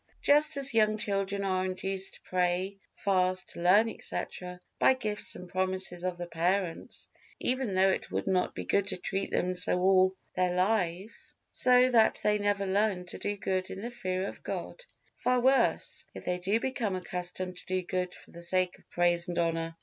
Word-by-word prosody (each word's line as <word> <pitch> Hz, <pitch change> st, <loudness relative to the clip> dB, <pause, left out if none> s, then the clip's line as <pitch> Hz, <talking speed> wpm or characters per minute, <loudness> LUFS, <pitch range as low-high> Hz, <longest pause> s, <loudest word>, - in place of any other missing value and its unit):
Just 295 Hz, 0 st, +6 dB
as 275 Hz, -1 st, +1 dB
young 215 Hz, -1 st, +3 dB
children 200 Hz, -1 st, -1 dB
are 185 Hz, -1 st, 0 dB
induced 190 Hz, +1 st, -2 dB
to -, -, -17 dB
pray, 185 Hz, +2 st, -1 dB, 0.2 s
fast, 185 Hz, -2 st, 0 dB
learn, 185 Hz, +6 st, +4 dB
etc., 180 Hz, -4 st, -4 dB, 0.2 s
by 260 Hz, -, +5 dB
gifts 215 Hz, -5 st, -1 dB
and 180 Hz, -, -9 dB
promises 185 Hz, -1 st, -1 dB
of 185 Hz, -1 st, -2 dB
the 175 Hz, -, -4 dB
parents, 175 Hz, +1 st, -2 dB, 0.3 s
even 250 Hz, -6 st, -1 dB
though 190 Hz, +1 st, +5 dB
it -, -, -3 dB
would -, -, -2 dB
not 185 Hz, -2 st, 0 dB
be -, -, -5 dB
good 200 Hz, -1 st, +1 dB
to -, -, -2 dB
treat 195 Hz, +2 st, -2 dB
them 180 Hz, +1 st, 0 dB
so 180 Hz, 0 st, +2 dB
all 185 Hz, 0 st, +4 dB, 0.2 s
their 180 Hz, -1 st, +1 dB
lives, 185 Hz, 0 st, -1 dB, 0.2 s
so 250 Hz, 0 st, +4 dB
that 225 Hz, -2 st, +4 dB
they 210 Hz, 0 st, +2 dB
never 205 Hz, -1 st, 0 dB
learn 195 Hz, -1 st, +1 dB
to 175 Hz, -, -5 dB
do 205 Hz, 0 st, -2 dB
good 185 Hz, -1 st, -2 dB
in 195 Hz, -, -7 dB
the 240 Hz, -, -4 dB
fear 185 Hz, -5 st, -2 dB
of -, -, -9 dB
God: -, -, -6 dB, 0.3 s
far 250 Hz, 0 st, +2 dB
worse, 265 Hz, +2 st, +2 dB
if -, -, -9 dB
they 180 Hz, 0 st, -1 dB, 0.2 s
become 230 Hz, -5 st, -2 dB
accustomed 180 Hz, 0 st, -4 dB
to -, -, -6 dB
do 185 Hz, 0 st, -1 dB
good 180 Hz, 0 st, -3 dB
for -, -, -16 dB
the 170 Hz, -, -10 dB
sake 180 Hz, +1 st, 0 dB
of -, -, -27 dB
praise 175 Hz, 0 st, +1 dB
and 175 Hz, -, -4 dB
honor. 165 Hz, -1 st, -1 dB
185 Hz, 185 wpm, -30 LUFS, 180-210 Hz, 0.3 s, Just